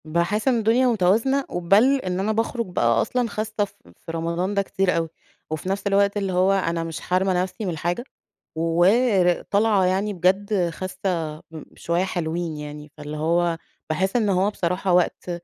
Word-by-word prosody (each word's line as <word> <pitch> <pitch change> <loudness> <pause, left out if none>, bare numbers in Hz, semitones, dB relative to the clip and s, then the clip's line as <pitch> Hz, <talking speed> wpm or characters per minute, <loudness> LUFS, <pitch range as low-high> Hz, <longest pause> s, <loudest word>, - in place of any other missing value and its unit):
باحِس 170 - 0
إن 255 -2 +4
الدُنيا 230 +4 +3
متوازنة، 230 +6 +2
وبل 205 +11 +3
إن 180 0 -2
أنا 205 +3 0
باخرُج 230 +2 -1
بقى 115 - +1
أصلًا 245 - -1
خَاسّة 215 0 -2
ف 195 - -19 0.3
في - - -5
رمضان 170 +4 -2
ده 200 - +2
كتير 195 -1 0
أوي، 165 -1 -1 0.4
وفي 155 +4 -4
نفس 200 +1 -2
الوقت 200 +1 +2
اللي 195 -2 -1
هو 185 +2 +3
أنا 170 -4 0
مش 165 -2 -5
حارمة 185 +1 +1
نفسي 190 +4 -6
من 175 -4 -3
حاجة، 175 +8 -2 0.5
ور 180 +3 +3
طالعة 205 -2 +2
يعني 195 +3 0
بجد 185 +1 +1
خَاسّة 180 -3 -3 0.2
م 160 -2 -8
شوية 170 +2 -1
حلوين 170 -3 -3
يعني، 150 0 -8
فاللي 150 0 -6
هو 170 +2 +1 0.3
باحِس 190 +6 0
إن 220 -4 +2
هو 190 +1 +2
بصراحة 180 -1 -1
وقت 180 0 +1
185 Hz, 170 wpm, -23 LUFS, 170-205 Hz, 0.5 s, إن